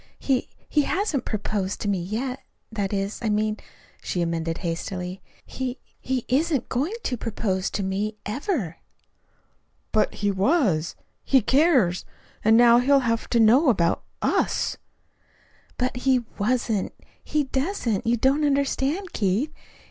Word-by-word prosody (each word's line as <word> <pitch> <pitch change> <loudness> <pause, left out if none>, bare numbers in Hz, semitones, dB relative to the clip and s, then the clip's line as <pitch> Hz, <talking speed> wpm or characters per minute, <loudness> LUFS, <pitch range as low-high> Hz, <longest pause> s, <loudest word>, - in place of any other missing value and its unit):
He 265 -3 0 0.2
he 300 - +3
hasn't 350 - -1
proposed 205 -2 -2
to - - -2
me 195 -3 0
yet. 245 +8 -3 0.3
That 205 -3 -2
is, 200 0 -2
I 225 - 0
mean," 215 0 +1 0.4
she 175 - -1
amended 165 -1 -2
hastily, 180 +2 -4 0.2
"he 260 0 -4 0.2
he 260 -2 -2
isn't 285 +1 +1
going 285 - -1
to 250 - -1
propose 195 -5 -2
to 200 - -2
me 205 +3 -2
ever." 220 - -2 1.1
"But 215 - +1
he 205 -1 0
was. 195 - +1 0.3
He 270 - +4
cares. 260 - +3 0.4
And 220 +1 +6
now 240 0 +7
he'll 275 +2 +4
have 230 -2 -1
to 235 - +2
know 250 +7 +6
about 170 -8 +2 0.2
us." - - +1 1.0
"But 250 0 -1
he 255 -1 +2
wasn't 225 -2 0 0.3
he 300 -1 0
doesn't. 265 - -1
You 240 +1 +3
don't 270 +6 +2
understand, 280 +5 0
Keith. 215 +10 0
230 Hz, 135 wpm, -25 LUFS, 200-270 Hz, 1.1 s, now